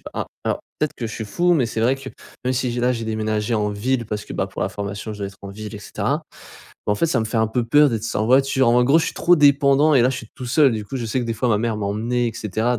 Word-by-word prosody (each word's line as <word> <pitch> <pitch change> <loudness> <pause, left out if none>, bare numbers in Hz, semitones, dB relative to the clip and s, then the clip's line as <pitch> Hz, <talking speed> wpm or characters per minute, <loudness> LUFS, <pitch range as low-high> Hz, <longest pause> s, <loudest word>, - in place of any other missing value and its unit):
pas - - -10
a - - -10 0.2
alors, - - -1 0.2
peut-être 150 - -1
que 115 - -3
je 110 - -7
suis 110 - -5
fou, 175 +11 +2
mais 130 -6 +2
c'est 110 -1 -3
vrai 130 +3 +3
que 135 - -9 0.4
même 130 - +1
si 125 -1 -1
j'ai 120 - -2
là, 125 +1 +2
j'ai 115 -2 -4
déménagé 110 0 -1
en 105 -1 +1
ville, 120 +3 -1
parce 105 -1 -4
que - - -9
bah, - - -1
pour - - -5
la - - -1
formation 100 +1 -5
je 105 - -9
dois 100 - -3
être 100 - -15
en 100 - -7
ville 105 +2 -8
et - - -6
cetera. 110 +10 -2 0.6
Bah, 105 - +2
en - - +1
fait, 105 - 0
ça 130 -7 +1
me 110 - -1
fait 115 - -3
un 110 0 +3
peu 120 +2 0
peur 145 +4 +5
d'être 110 -2 -2
sans 110 - -1
voiture, 135 +1 +3
en 120 +1 +4
gros 145 +6 +5
je - - +1
suis - - -3
trop 175 0 +4
dépendant 145 0 +4
et 130 - +6
là 125 - +4
je 130 - -3
suis 115 - -10
tout 125 - -7
seul, 140 +1 +4
du 110 -2 -3
coup, 135 - -5
je 120 - -3
sais 125 +4 -1
que - - -3
des 115 - -2
fois 125 +2 -1
ma 105 - +3
mère 115 0 -1
m'emmenait 115 +4 -1
et 115 - -5
cetera 110 +4 -1
120 Hz, 325 wpm, -21 LUFS, 110-130 Hz, 0.6 s, et